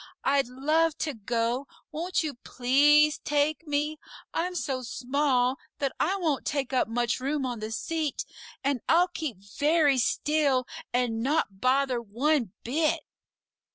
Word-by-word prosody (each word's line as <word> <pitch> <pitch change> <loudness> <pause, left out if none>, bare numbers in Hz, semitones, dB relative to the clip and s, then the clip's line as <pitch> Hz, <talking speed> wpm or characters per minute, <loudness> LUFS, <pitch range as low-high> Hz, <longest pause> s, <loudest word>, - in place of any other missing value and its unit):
I'd 275 -2 +2
love 305 +5 +1
to 300 - -3
go; 235 +4 -1 0.2
won't 340 +3 -1
you 305 -2 -3
PLEASE 290 +5 +3
take 295 +2 0
me? 295 +1 -1 0.3
I'm 360 +2 -1
so 270 -6 -2
small 255 +1 +1 0.2
that 275 -2 -1
I 375 +5 +2
won't 320 -8 0
take 275 -2 -2
up 255 - +2
much 240 +1 0
room 275 +1 -1
on 245 -3 -3
the 215 0 -4
seat, 310 +4 -2 0.4
and 275 -3 0
I'll 355 +2 +5
keep 315 - -4 0.2
very 295 -2 +4
still 280 0 +1 0.3
and 240 -2 0
not 240 -8 0
bother 260 -1 +2
one 240 - 0
bit!" 305 +6 +1
280 Hz, 140 wpm, -27 LUFS, 250-305 Hz, 0.4 s, I'll